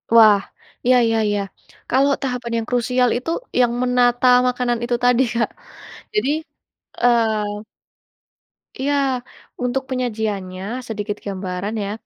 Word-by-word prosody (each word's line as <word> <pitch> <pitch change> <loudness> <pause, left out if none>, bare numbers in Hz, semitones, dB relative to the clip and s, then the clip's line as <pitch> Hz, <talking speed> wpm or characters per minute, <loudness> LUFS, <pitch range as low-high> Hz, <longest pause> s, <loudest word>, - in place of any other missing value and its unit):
Wah! 215 -3 +8 0.5
Iya 255 +1 +5
iya 225 0 +1
iya, 205 -1 0 0.5
kalo 265 +3 +3
tahapan 250 -3 -3
yang 225 0 -3
krusial 250 0 +2
itu 250 +6 -5 0.3
yang 245 -1 +4
menata 250 0 +3 0.2
makanan 245 -1 0
itu 240 0 0
tadi, 245 0 +4
Kak. 230 - +1 0.6
Jadi, 420 -10 +1 0.7
eee 220 -3 +2 1.2
Iya. 275 -2 +1 0.4
Untuk 250 +2 0
penyajiannya, 215 -3 -3
sedikit 210 -1 -4
gambaran 195 +1 -4
ya. 200 - -3
240 Hz, 115 wpm, -20 LUFS, 210-250 Hz, 1.2 s, Wah